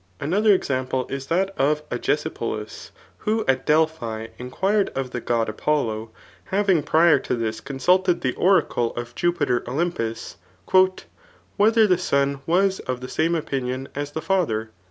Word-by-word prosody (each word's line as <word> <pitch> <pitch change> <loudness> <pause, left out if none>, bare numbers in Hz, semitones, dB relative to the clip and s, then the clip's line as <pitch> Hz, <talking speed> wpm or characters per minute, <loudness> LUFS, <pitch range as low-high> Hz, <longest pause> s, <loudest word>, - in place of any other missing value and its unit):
Another 205 +8 +2
example 130 -7 0
is 135 0 -4
that 190 +3 0
of 150 +2 +1
Agesipoli^ - - -3 0.3
who 220 +1 -1
at 130 -1 +1
Delphi 150 -8 0
inquired 190 +12 0
of 135 -2 -3
the 125 - -4
god 115 -1 0
[Apollo,] 110 -2 -1 0.4
having 195 -4 +2
prior 160 +3 +4
to - - -2
this 110 -1 -3
consulted 175 +7 +1
the 130 -2 0
oracle 170 -10 +2
of 120 0 -6
Jupiter 145 -8 0
Olympus, 125 -5 -3 0.6
'' - - -20
Whether 220 +2 +4
the.son 140 -7 +1
was 190 +3 +2
of 130 -1 -4
the 130 - -6
same 165 +2 +1
opinion 135 -4 -3
as 145 0 -5
the 160 - -4
father 150 - 0
145 Hz, 140 wpm, -23 LUFS, 125-180 Hz, 0.6 s, prior